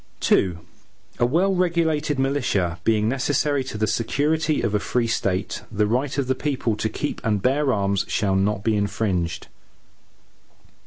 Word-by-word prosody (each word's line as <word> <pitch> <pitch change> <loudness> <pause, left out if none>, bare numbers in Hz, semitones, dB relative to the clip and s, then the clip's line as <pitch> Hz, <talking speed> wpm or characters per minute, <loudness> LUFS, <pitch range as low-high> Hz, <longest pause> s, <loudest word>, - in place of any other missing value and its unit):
II 90 -3 +3 0.6
A 120 - +4
well 180 +9 +2
regulated 165 -5 +1
militia, 125 -11 0
being 110 0 +2
necessary 135 +2 +1
to 115 - -6
the 110 - +1
security 145 +9 0
of 110 -3 0
a 105 - +2
free 120 +3 0
State, 100 -4 -1
the 105 0 +1
right 125 +6 -1
of 140 - +1
the 130 - +1
people 130 -5 -1
to 110 +1 -2
keep 145 +7 -4
and 105 -3 +1
bear 135 +5 +2
arms, 100 -2 +1
shall 100 -4 0
not 100 +1 0
be 110 0 +2
infringed. 100 -4 -1
115 Hz, 155 wpm, -23 LUFS, 105-145 Hz, 0.6 s, A